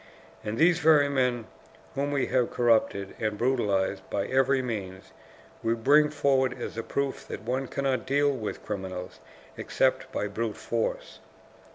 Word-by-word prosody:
And 110 +1 -3
these 170 +1 +4
very 150 -3 +5
men 125 -4 0 0.5
whom 140 +1 -1
we 140 -2 +1
have 125 -2 +1
corrupted 110 -5 +1
and 110 -1 -1
brutalized 100 -6 0
by 100 - -1
every 135 +1 +2
means, 95 -6 -5 0.5
we 115 0 +1
bring 145 +6 +4
forward 130 -3 +1
as - - -5
a 115 - -2
proof 135 +4 -3
that - - -7
one 130 +3 -2
cannot 135 -1 -1
deal 145 +1 +3
with 120 -6 -5
criminals 95 -6 -5 0.4
except - - 0
by - - -2
brute 110 +2 -3
force. 115 -1 -3
125 Hz, 150 wpm, -27 LUFS, 105-135 Hz, 0.5 s, very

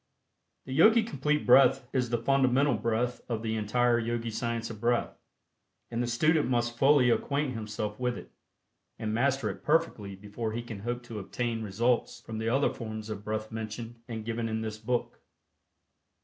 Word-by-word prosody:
The 130 - -5
Yogi 220 - +6
Complete 150 - -1
Breath 125 0 +6
is 125 -2 +1
the 120 - +1
fundamental 135 +2 +3
breath 120 +2 -1
of 115 -2 -2
the 110 -1 -1
entire 120 +3 +2
Yogi 115 0 -2
Science 115 +1 -2
of 110 -1 -10
Breath, 120 0 +1 0.8
and 115 0 -1
the 120 - -1
student 150 +5 +2
must 120 -1 0
fully 135 -1 +5
acquaint 140 +2 0
himself 105 -1 -4
with 125 -1 -1
it, - - -11 0.7
and 110 -1 -3
master 130 0 +1
it 95 - -11
perfectly 150 -11 +1
before 105 +3 -5
he 120 +1 -3
can 115 -4 -7
hope 120 +3 -3
to 115 -3 -7
obtain 115 +3 -3
results 115 +4 0
from 110 -1 -7
the 110 0 -1
other 135 +4 +2
forms 110 -2 -6
of 105 -1 -6
breath 110 +1 -3
mentioned 115 +1 -6
and 110 -3 -5
given 115 0 -2
in 110 0 -2
this 110 -1 -5
book. 120 +2 -2
120 Hz, 175 wpm, -29 LUFS, 110-125 Hz, 0.8 s, Yogi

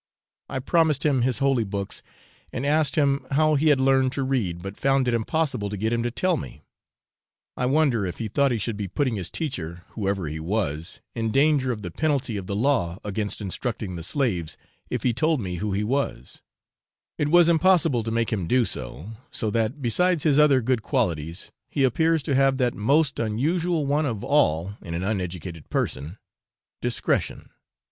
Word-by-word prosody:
I - - -3
promised 155 +2 +2
him 140 -4 +3
his 125 -2 +1
holy 135 -3 +2
books, 100 -1 -4 0.5
and 125 - -3
asked 150 -1 +2
him 140 -3 +1
how 155 +2 +4
he 150 +2 +2
had 145 -3 +5
learned 130 -1 +3
to 140 - -1
read, 105 -11 -1
but 95 +1 -7
found 135 -1 +2
it 120 - +2
impossible 125 -2 0
to 105 - -4
get 110 +4 0
him 115 - +1
to 120 - -1
tell 180 +8 +1
me. - - -8 0.9
I 125 - 0
wonder 135 -6 +2
if 90 -3 -4
he 115 - -3
thought 140 +6 +2
he 120 - +1
should 110 0 -3
be 100 -2 -3
putting 130 +3 -1
his 90 -4 -3
teacher, 90 - -4
whoever 100 -5 -2
he 75 +2 -4
was, 85 -2 -3
in 115 -1 -1
danger 135 0 +3
of 105 -3 -5
the 90 - -5
penalty 140 - 0
of 95 -2 -5
the 100 - -2
law 105 -8 +1
against 105 +1 -3
instructing 105 -1 -4
the 85 - -5
slaves, 90 - -1 0.3
if - - -3
he 125 - +2
told 155 +5 +1
me 90 -5 -4
who 105 +4 -2
he 100 +2 0
was; 125 - -2 0.8
it 150 - +1
was 175 +2 +6
impossible 170 -6 +4
to 115 - -4
make 115 0 0
him 95 -6 -2
do 125 +2 +3
so, 75 - -5 0.2
so 110 -3 -2
that, 115 +6 -1
besides 175 +7 +2
his 150 -2 +4
other 145 -3 +5
good 125 -1 +1
qualities, 85 - -2 0.2
he 140 - 0
appears 160 +4 +2
to 140 - -1
have 135 0 +3
that 125 -2 +1
most 140 +7 +2
unusual 155 +9 0
one 145 +2 +1
of 110 -6 -3
all 100 - +2
in 85 -4 -6
an 85 - -2
uneducated 90 -5 -4
person 80 +8 -2 0.6
discretion. - - -1
120 Hz, 190 wpm, -25 LUFS, 100-140 Hz, 0.9 s, was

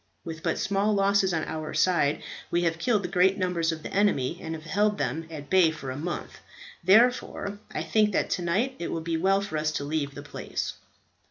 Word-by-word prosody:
With 165 -1 -6
but 170 -2 0
small 200 +2 +1
losses 195 -1 +3
on 165 -2 0
our 155 -1 -5
side, 155 -6 +2 0.3
we 175 0 +1
have 165 -1 0
killed 200 -3 +1
great 190 +1 +4
numbers 180 -3 0
of 160 -1 -6
the - - -7
enemy, 180 -6 +1
and 160 0 -4
have 155 - -9
held 205 +6 +1
them 165 -4 -2
at 150 -3 -8
bay 185 -2 +5
for 135 -4 -6
a - - -5
month. 165 +5 -5 0.4
Therefore, 205 0 +3
I - - -3
think 215 -1 +2
that - - 0
tonight 190 +10 0
it 170 - -3
will 165 - -2
be 165 0 -2
well 195 +4 +3
for 200 -6 -4
us 155 0 0
to 145 - -2
leave 145 -1 -2
the 145 - -7
place." 145 - -4
175 Hz, 205 wpm, -27 LUFS, 160-200 Hz, 0.4 s, bay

